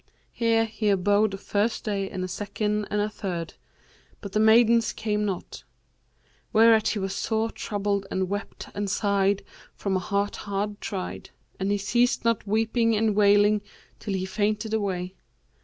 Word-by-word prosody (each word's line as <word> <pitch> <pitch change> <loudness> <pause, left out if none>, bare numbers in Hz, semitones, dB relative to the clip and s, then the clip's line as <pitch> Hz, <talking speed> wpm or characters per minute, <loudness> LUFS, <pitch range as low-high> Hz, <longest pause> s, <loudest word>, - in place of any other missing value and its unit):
Here 230 -1 +2
he 215 -1 -2
abode 205 +1 +2
a - - -7
first 205 +3 -1
day 200 -2 -2
and 185 -2 -4
a - - -2
second 210 +2 -2
and 210 - 0
a 205 - +1
third, 180 -6 -5 0.7
but 200 - -8
the 215 - +1
maidens 225 0 +5
came 210 -1 -1
not; 195 -3 -5 0.9
whereat 220 -1 +5
he - - 0
was 195 -1 -2
sore 220 +1 -1
troubled 200 -2 -2
and 190 0 -1
wept 205 +2 -5
and 205 0 -2
sighed 200 -1 +1 0.3
from 195 -2 -2
a - - +2
heart 200 +2 -1
hard 205 0 -3
tried; 190 -3 -5 0.3
and 195 +1 -1
he 205 - +2
ceased 240 +5 +1
not 230 -3 +1
weeping 225 +2 +2
and 215 -1 +1
wailing 205 0 +4 0.4
till 200 - -3
he 185 0 -2
fainted 210 +3 -1
away. 185 -4 -2
205 Hz, 160 wpm, -26 LUFS, 195-220 Hz, 0.9 s, maidens